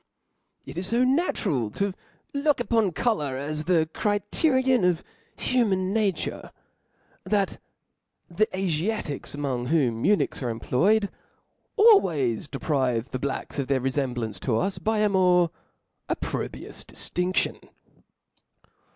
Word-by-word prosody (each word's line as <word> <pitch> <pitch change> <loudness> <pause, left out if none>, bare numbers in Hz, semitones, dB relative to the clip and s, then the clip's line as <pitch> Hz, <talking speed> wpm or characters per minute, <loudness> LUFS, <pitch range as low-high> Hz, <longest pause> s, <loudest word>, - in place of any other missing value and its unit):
It 170 - -6
is 185 +1 -3
fo 235 +3 +3
natural 235 - +1
to 200 -1 0 0.4
look 285 0 +2
upon 225 -5 +2
colour 160 - 0
as 150 +2 -3
the 165 -3 +3
cri* 205 -1 +1
terion 260 - +3
of 180 -2 +2 0.3
human 195 -7 +1
nature, 210 -4 -1 0.7
that 200 -2 0 0.7
the 210 +5 +1
Afiatics, 185 -5 -2
among 130 -4 -2
whotp 125 -7 +1
eunuchs 205 -6 +2
are 125 - -1
employed, 195 - +2 0.7
always 170 - +4
deprive 130 -5 -1
the 130 - -3
Blacks 140 +1 -3
of 135 - -1
their 135 -1 +2
refemblancc 125 -6 -2
to 110 +1 0
us, 195 - -1
by 220 0 0
a 210 - +4
more 180 -3 +4 0.6
op - - -1
probrious - - -5
diftindlion. 180 +1 -2
180 Hz, 120 wpm, -26 LUFS, 135-215 Hz, 0.7 s, always